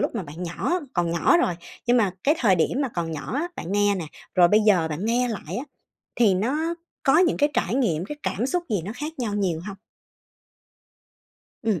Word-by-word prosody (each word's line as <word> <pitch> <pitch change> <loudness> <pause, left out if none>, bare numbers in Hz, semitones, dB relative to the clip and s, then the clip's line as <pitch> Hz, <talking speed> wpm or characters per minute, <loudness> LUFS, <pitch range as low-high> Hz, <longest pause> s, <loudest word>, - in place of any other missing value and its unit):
lúc - - -1
mà 215 - -2
bạn 160 +3 -8
nhỏ 325 - -1
còn 175 -2 0
nhỏ 170 - +4
rồi, 180 - +1 0.3
nhưng 245 +1 +4
mà 200 -6 +2
cái 300 +3 +4
thời 205 - +4
điểm 180 - +1
mà 270 - 0
còn 165 -2 -2
nhỏ 155 +6 -5
á, 330 +5 -1
bạn 180 - -5
nghe 205 0 +3
nè, 180 -4 -3 0.3
rồi 175 -2 +6
bây 215 +3 +5
giờ 190 -7 +3
bạn 160 +6 -4
nghe 245 +2 +1
lại 220 - -5
á, 270 - -4 0.5
thì 215 -6 +4
nó 300 - 0 0.3
có 305 +3 +5
những 355 -2 +3
cái 290 0 +3
trải 200 +6 0
nghiệm, 180 - +1
cái 295 - -6
cảm 235 +6 -1
xúc 350 +5 0
gì 200 -5 +1
nó 210 - -4
khác 300 +4 -4
nhau 220 -4 -2
nhiều 180 -6 0
hông? 200 -1 -6 1.9
Ừm, 210 -7 0
210 Hz, 220 wpm, -24 LUFS, 175-265 Hz, 1.9 s, rồi